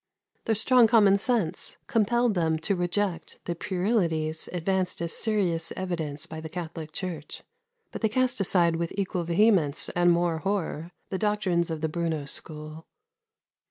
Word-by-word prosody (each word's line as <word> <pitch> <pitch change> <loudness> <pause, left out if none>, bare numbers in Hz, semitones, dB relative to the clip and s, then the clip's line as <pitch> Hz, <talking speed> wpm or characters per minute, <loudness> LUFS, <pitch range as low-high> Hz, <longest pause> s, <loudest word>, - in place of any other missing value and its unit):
Their 225 - +2
strong 240 +2 +5
common 205 -3 +5
sense 215 -7 -1
compelled 235 +1 +2
them 165 -3 +1
to 160 +5 -1
reject 175 0 -1
the 175 - -1
puerilities 170 -4 -1
advanced 180 +1 -1
as 170 -1 -2
serious 185 -7 0
evidence 160 -6 -3
by 160 0 -8
the 160 - -7
Catholic 160 -2 -6
Church; 165 -4 -5 0.5
but - - -7
they 220 - +2
cast 255 -1 +1
aside 170 -3 +3
with 170 0 -2
equal 185 -3 -1
vehemence 170 -4 +2
and 175 0 +3
more 170 -1 +1
horror 175 -3 -2 0.2
the 190 - -2
doctrines 205 -5 +1
of 160 -1 -4
the 160 - +1
Bruno 160 -2 -2
school. 155 +2 -6
175 Hz, 150 wpm, -27 LUFS, 160-205 Hz, 0.5 s, strong